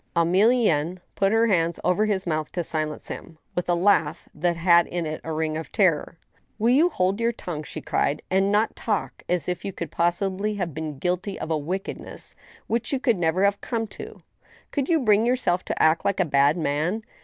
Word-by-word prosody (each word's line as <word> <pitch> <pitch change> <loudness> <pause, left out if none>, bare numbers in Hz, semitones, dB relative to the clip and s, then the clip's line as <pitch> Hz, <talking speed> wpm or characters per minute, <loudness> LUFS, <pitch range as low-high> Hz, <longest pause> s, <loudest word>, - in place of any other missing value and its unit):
Emilienne 180 -2 +3 0.2
put 195 0 +1
her 225 +1 +4
hands 170 -6 +1
over 180 +4 +2
his 195 -3 0
mouth 155 -2 -2
to 175 - -2
silence 155 -2 -2
him, 165 - -8 0.2
with 180 0 -3
a 175 - +4
laugh 170 -4 +2
that 170 +2 0
had 170 0 +5
in 175 -1 -3
it 155 0 -4
a 160 - -5
ring 155 0 -1
of 160 0 -6
terror. 170 -4 +1 0.2
" - - -40
Will 230 +2 +2
you 310 +7 +5
hold 190 - 0
your 230 +1 +2
tongue," 175 -9 -6
she 150 - -7
cried, 145 - -1
" - - -45
and 195 +1 +3
not 210 +2 +2
talk 210 -3 -3
as 175 -4 0
if 180 -1 -3
you 195 - -3
could 170 -2 -6
possibly 190 +4 0
have 180 -6 -3
been 155 -2 -5
guilty 180 +6 -2
of 160 - -4
a - - +2
wickedness 185 +6 -6 0.3
which 230 0 -1
you 275 - 0
never 175 -1 0
could - - +5
have 200 0 +1
come 230 -2 -2
to? 430 - -10 0.5
Could 280 -2 -1
you 325 -3 +3
bring 215 -3 +4
yourself 230 -8 +1
to - - -3
act 160 +1 +3
like 200 -1 0
a 185 - +3
bad 140 +1 +3
man 160 +7 -1
180 Hz, 210 wpm, -24 LUFS, 160-210 Hz, 0.5 s, had